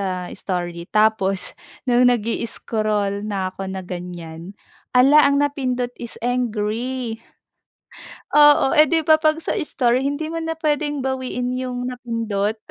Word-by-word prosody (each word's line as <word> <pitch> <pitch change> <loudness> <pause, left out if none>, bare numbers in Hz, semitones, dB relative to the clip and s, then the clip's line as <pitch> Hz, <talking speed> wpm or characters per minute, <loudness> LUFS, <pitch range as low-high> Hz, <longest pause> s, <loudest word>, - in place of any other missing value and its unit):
sa 185 -2 -3
story 175 -2 -4
tapos 210 -3 +1 0.3
no'ng 245 -1 +4
nag-i-scroll 215 -3 -1
na 190 -2 -2
ako 195 +1 -6
na 190 0 -5
ganiyan, 175 0 -8 0.4
ala 275 +4 +7
ang 280 0 +3
napindot 255 -4 -2
is 235 - -6
angry. 240 0 -2 1.2
Oo, 295 -1 +6
eh, 305 -1 +6
'di 325 -2 +1
ba, 315 0 +5
'pag 310 0 +3
sa - - 0
story 250 -5 +1
hindi 285 +3 -2
mo 330 - -3
na 325 0 -3
puwedeng 295 -3 -1
bawiin 255 -1 -2
'yung 250 -1 -3
napindot. 230 -4 -2
245 Hz, 130 wpm, -21 LUFS, 200-275 Hz, 1.2 s, ala